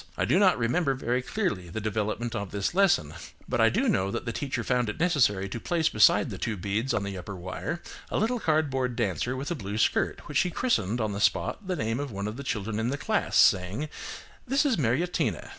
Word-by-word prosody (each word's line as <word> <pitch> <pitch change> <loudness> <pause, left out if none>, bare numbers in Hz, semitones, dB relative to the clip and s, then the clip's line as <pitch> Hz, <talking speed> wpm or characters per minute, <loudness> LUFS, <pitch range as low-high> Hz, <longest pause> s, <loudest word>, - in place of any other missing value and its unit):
I - - +1
do 160 +10 +3
not 190 -3 +5
remember 135 +5 +1
very 125 -1 -1
clearly 125 - -2
the 100 - -4
development 110 +2 -2
of 100 -3 -3
this 100 - -2
lesson, 175 - +3 0.3
but - - 0
I - - +6
do - - +1
know 95 +1 +1
that - - -4
the 115 - -2
teacher 130 -1 -3
found 125 -1 +1
it 105 - -5
necessary 125 - +2
to 115 - -5
place 165 +4 +1
beside 105 -1 +4
the 95 - -6
two 110 -3 -2
beads 105 +7 -1
on 105 - 0
the 100 -1 -4
upper 100 +3 -7
wire 95 - -5 0.3
a - - -1
little 235 +3 +1
cardboard 135 - 0
dancer 115 +2 -1
with 135 +5 -4
a - - +2
blue 100 -5 -5
skirt, - - 0
which - - +1
she 180 - +2
christened 125 - 0
on 110 -2 0
the 100 +1 -4
spot 185 - 0
the 185 - 0
name 115 -4 -1
of 145 -2 -4
one 100 0 -4
of 105 - -4
the 140 - -6
children 105 -3 -2
in 115 +2 0
the 140 - -2
class, - - 0
saying, 95 +11 +3 0.6
"This 275 +4 +2
is 265 -5 +3
Mariettina." 145 - 0
120 Hz, 225 wpm, -27 LUFS, 100-155 Hz, 0.6 s, I